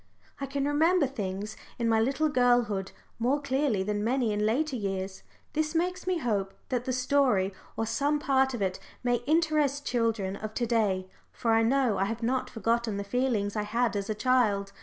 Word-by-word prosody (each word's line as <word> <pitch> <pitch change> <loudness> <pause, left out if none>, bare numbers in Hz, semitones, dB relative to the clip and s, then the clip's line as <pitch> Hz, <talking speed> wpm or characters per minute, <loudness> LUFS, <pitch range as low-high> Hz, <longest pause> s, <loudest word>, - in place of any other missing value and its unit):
I 275 - -3
can 275 +1 -2
remember 315 +3 +3
things 210 -4 -4 0.2
in 235 - 0
my 225 -1 +3
little 270 +7 +1
girlhood 245 -8 +2 0.3
more 255 +5 +2
clearly 270 -7 0
than 205 +1 -1
many 240 -1 +1
in 210 +1 +1
later 275 +5 0
years. 195 -3 -3 0.3
This 310 +1 -1
makes 360 +2 -1
me 370 -1 +2
hope 205 -9 -1
that 250 -2 -1
the 260 - -1
story 255 -7 +2 0.2
of 225 - -1
some 285 +6 +1
part 265 -2 +2
of 210 - -2
it 185 -1 -1 0.2
may 245 -1 +2
interest 305 -3 +2
children 225 -5 0
of 215 +1 -6
to 240 - 0
day, 205 -5 +1 0.2
for 230 -1 0
I 225 - +4
know 235 -3 +2
I 195 - +2
have 225 +3 -4
not 255 +2 0
forgotten 230 -1 0
the 200 - -2
feelings 220 -2 0
I 210 - 0
had 230 +2 0
as 200 0 -3
a 215 - 0
child. 210 -5 +2
235 Hz, 190 wpm, -28 LUFS, 210-275 Hz, 0.3 s, I